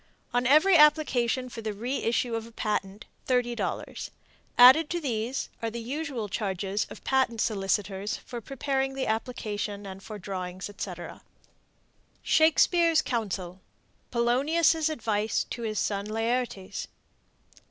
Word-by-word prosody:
On 245 0 +2
every 325 +7 +6
application 270 -5 +4
for 235 -2 -8
the 215 -1 -3
reissue 240 +1 -1
of 225 0 -3
a - - -14
patent, 210 -2 -3 0.2
$30. 245 -2 -1 0.5
Added 260 +6 +8
to 345 - -1
these 245 -3 -2
are 230 - -1
the 235 +1 -6
usual 260 -2 -4
charges 195 0 -2
of - - -11
patent 265 -4 +1
solicitors 200 -1 -1
for 240 -1 -8
preparing 270 +2 -2
the 270 - -1
application 215 -3 -3
and 190 0 -8
for 215 +1 -8
drawings 185 0 -5
etc. 180 -3 -7 1.0
SHAKESPEARE'S 330 +1 +4
COUNSEL. 190 -6 -3 0.5
(Polonius' 300 +7 +2
Advice 220 -7 0
to 235 - -4
His 215 -2 -3
Son 200 0 -1
Laertes.) 225 -2 -2
230 Hz, 120 wpm, -28 LUFS, 205-265 Hz, 1.0 s, Added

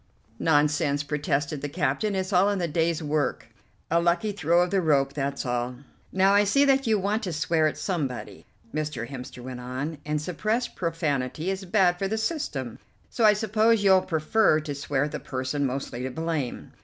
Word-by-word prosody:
"Nonsense," 145 -2 +2
protested 145 0 -1
the 145 - -3
captain, 170 +7 -1
"it's 190 +1 -2
all 185 +3 +5
in 205 - 0
the 175 -2 -1
day's 165 +1 0
work: 150 0 -1 0.4
a 170 +1 +4
lucky 175 +5 +1
throw 175 -2 +2
of 180 - -3
the 195 -1 +2
rope, 140 -4 +2
that's 140 -1 -3
all." 125 0 -2 0.4
"Now 190 +1 +4
I 205 +1 +5
see 275 +8 +3
that 270 -2 +3
you 220 -1 +3
want 205 +3 0
to 185 - -3
swear 160 0 +1
at 155 - -3
somebody," 145 -10 -4 0.3
Mr. 150 -6 -3
Hemster 125 -1 -8
went 125 0 -6
on, 130 +5 -5
"and 150 0 -1
suppressed 215 +10 -2
profanity 160 -1 -1
is 190 0 -4
bad 180 -2 +3
for 195 - 0
the 220 +3 -2
system; 185 - -3 0.3
so 230 - +2
I 210 - +7
suppose 220 +1 +2
you'll 190 -1 +6
prefer 160 +1 +2
to 150 -1 -5
swear 140 -1 -1
at 150 - -3
the - - -4
person 130 +2 -2
mostly 130 -2 -4
to 130 - -2
blame. 160 -2 -3
160 Hz, 190 wpm, -26 LUFS, 140-195 Hz, 0.4 s, I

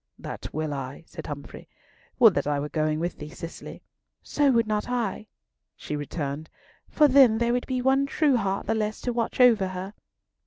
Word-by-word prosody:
"That - - -7
will 155 -1 -3
I," 135 +2 -6
said - - -9
Humfrey. 145 -1 -8 0.5
"Would - - +7
that - - -1
I 145 -1 0
were 145 +1 -4
going 155 0 0
with 175 +1 -3
thee, 150 - -7
Cicely!" 165 +2 -9 0.4
"So 290 -1 +2
would 230 -2 +3
not 215 +1 -2
I," 225 -4 -2 0.5
she 150 - -5
returned; 145 0 -4 0.4
"for 300 - +5
then 260 -5 +6
there 235 +1 +1
would 245 - -1
be 255 -1 -2
one 270 +1 +3
true 285 -1 +2
heart 195 -4 -1
the - - 0
less 215 -1 -2
to 245 - -2
watch 230 +1 -2
over 230 -6 +5
her." 185 +2 -6
210 Hz, 190 wpm, -26 LUFS, 155-245 Hz, 0.5 s, Would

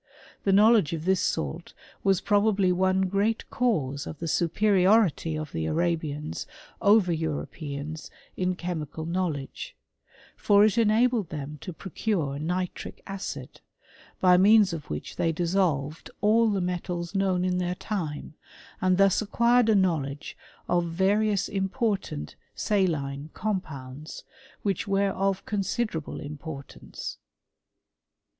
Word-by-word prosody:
The 195 - +4
know 210 +4 +7
ledge 205 -10 +3
of 160 0 -4
this 190 -1 +3
salt 70 -2 -3 0.3
was 195 -2 +3
probably 205 -2 +3
one 185 +1 +2
great 200 +4 0
cause 145 - 0
of 155 - -7
the 165 - -5
superiority 185 -1 +3
of 155 -1 -5
the 80 -1 -2
Arabians 160 - -2 0.3
over 205 -3 +5
Europeans 155 -1 -4 0.3
in 185 0 0
chemical 160 -3 -4
knowledge; 165 -5 -3 0.6
for 205 0 +5
it 215 - +2
enabled 225 -2 +3
them 150 0 -6
to 185 - -6
procure 170 -5 -2
nitric 180 +3 -4
add^ 195 -1 -6 0.6
by 180 -1 +6
means 205 0 +6
of 160 -4 -6
which 75 - -5
they 165 - +2
dissolved 165 -4 0
all 220 +2 +4
the 200 -2 0
metals 175 -1 -3
known 190 -2 +1
in 180 0 0
their 180 0 -1
time, 165 -9 -4 0.5
and 185 -1 +3
thus 195 +1 +4
acquired 235 +2 +3
a 220 - +5
knowledge 155 -7 0 0.3
of 175 -1 +2
va 185 +4 +1
rious 210 -2 +1
important 195 - -2 0.2
saline 155 -8 0
compounds, 155 -8 -5 0.4
which 200 -1 -1
were 200 0 +2
of 195 0 -1
con 210 - -2
siderable 195 -5 -2
importance. 145 -1 -8
180 Hz, 125 wpm, -27 LUFS, 155-200 Hz, 0.6 s, know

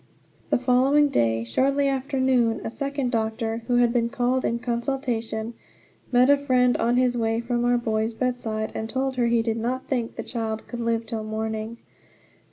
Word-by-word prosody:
The - - +3
following 265 +4 +3
day, 115 - +1
shortly 275 - +1
after 270 0 -1
noon, 250 -3 +2
a - - -4
second 280 -1 -2
doctor, 225 0 -1
who 245 - +2
had 240 -1 +3
been 235 -1 +1
called 250 +2 0
in 235 - 0
consultation, 235 -2 -2 0.6
met 250 0 +5
a 285 0 +6
friend 255 -3 +2
on 240 +1 +1
his 250 -1 +2
way 225 -1 0
from 240 0 -1
our 245 0 +3
boy's 225 -1 -1
bedside 225 -3 -2
and 220 - -4
told 265 +2 -1
her 240 -1 +2
he 235 -1 +2
did 225 -1 -1
not 250 +3 -2
think 240 -4 -2
the - - -5
child 220 -2 -4
could 240 - -6
live 230 -1 0
till 220 -1 -4
morning. 220 +1 -4
240 Hz, 180 wpm, -25 LUFS, 225-255 Hz, 0.6 s, a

